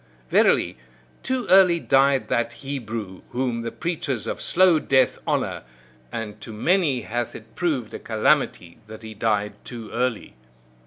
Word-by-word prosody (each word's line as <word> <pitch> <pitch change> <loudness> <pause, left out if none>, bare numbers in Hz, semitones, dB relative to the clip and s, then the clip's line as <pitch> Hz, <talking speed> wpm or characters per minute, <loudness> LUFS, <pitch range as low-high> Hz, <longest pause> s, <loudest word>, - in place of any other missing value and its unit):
Verily, - - +3 0.4
too 260 -2 -2
early 185 -3 +6
died 135 -2 +3
that 120 0 0
Hebrew 115 -7 -6
whom 125 -2 -2
the 115 0 -4
preachers 150 - -3
of - - -4
slow 180 -3 +4
death 130 -3 +2
honour: - - -1 0.5
and 105 -2 -6
to 110 - -8
many 145 - +1
hath 120 +1 -3
it - - -12
proved 145 -11 -2
a - - -5
calamity 110 - 0
that 110 +1 -11
he 110 0 -8
died 105 -1 0
too 115 -3 -8
early. 125 -1 -2
120 Hz, 145 wpm, -24 LUFS, 110-150 Hz, 0.5 s, early